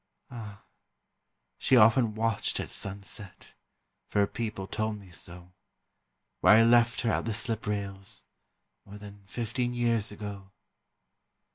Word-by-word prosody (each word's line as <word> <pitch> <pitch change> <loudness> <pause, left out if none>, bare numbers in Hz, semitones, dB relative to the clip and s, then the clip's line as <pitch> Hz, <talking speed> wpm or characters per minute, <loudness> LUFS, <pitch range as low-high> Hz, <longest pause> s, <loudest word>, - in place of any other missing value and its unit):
Ah! 105 -4 -9 1.0
she 130 - +4
often 115 0 +5
watched 110 -1 0
at - - -5
sunset 100 0 -8 0.5
For - - -4
her 100 - +5
people 110 -2 -4
told 110 +2 -2
me 95 -3 -15
so 90 +1 -2 0.9
Where 105 - +7
I 115 - +7
left 120 0 +4
her 115 - +1
at - - 0
the 115 - -1
slip 110 -1 -3
rails 100 0 -4 0.6
More 100 +1 -11
than 100 -1 -11
fifteen 120 +4 -2
years 115 -3 +1
ago. 100 -2 -7
105 Hz, 130 wpm, -29 LUFS, 100-115 Hz, 1.0 s, Where